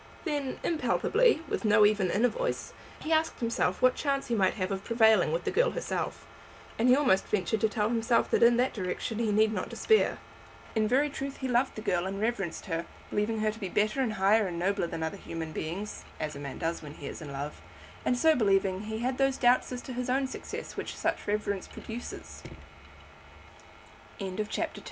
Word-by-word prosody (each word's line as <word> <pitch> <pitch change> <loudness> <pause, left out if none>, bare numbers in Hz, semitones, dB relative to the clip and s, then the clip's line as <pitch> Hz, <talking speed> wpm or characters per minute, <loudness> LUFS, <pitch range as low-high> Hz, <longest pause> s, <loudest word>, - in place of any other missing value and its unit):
Then, 290 -5 -2
impalpably, 415 +4 +2
with - - -2
no 210 -1 +6
even 205 -3 +3
inner 225 +7 +3
voice, - - -3 0.3
he 315 - -4
asked 320 +1 +1
himself 230 -4 0
what 255 0 +6
chance 275 -2 -1
he - - 0
might 195 -4 +2
have 185 -1 -2
of 195 0 -3
prevailing 220 -8 +4
with 170 +2 -1
the - - -1
girl - - +3
herself; - - -3 0.5
and 240 +3 +4
he 250 - +8
almost 250 -10 +3
ventured 210 +1 0
to 220 - +3
tell 210 0 0
himself 230 0 +2
that - - +3
in 235 0 +6
that 250 +2 +2
direction 200 +3 -3
he 225 -2 +1
need 215 +1 +3
not - - -3
despair. 440 -1 +2 0.6
In 220 -1 +2
very 270 +6 +3
truth 275 0 -5
he 265 - -3
loved 250 +1 +1
the 215 - -6
girl 180 -2 0
and 195 +1 -4
reverenced 210 -6 -2
her, 165 -1 -3 0.2
believing 215 +1 0
her 215 0 +2
to 220 - -11
be 195 -4 -4
better 215 +7 +1
and 235 -4 0
higher 205 +2 +3
and 175 -2 -4
nobler 190 0 0
than 160 - -4
other 160 +5 -3
human 165 -4 -6
beings, 185 +8 -5 0.2
as 155 -1 -3
a - - -7
man 140 -2 -6
does 165 +1 -2
when 150 -1 -9
he 145 - -9
is - - -6
in 150 -3 -7
love; 140 +2 -5 0.4
and 250 - +1
so 320 +5 +5
believing, 195 -6 +2
he 220 +1 -4
had 255 +2 -1
those 270 -1 +2
doubts 245 +1 +3
as 250 -1 -5
to 260 - -7
his 250 +1 -3
own 265 +2 +2
succe 265 - -6
220 Hz, 195 wpm, -29 LUFS, 190-255 Hz, 0.6 s, he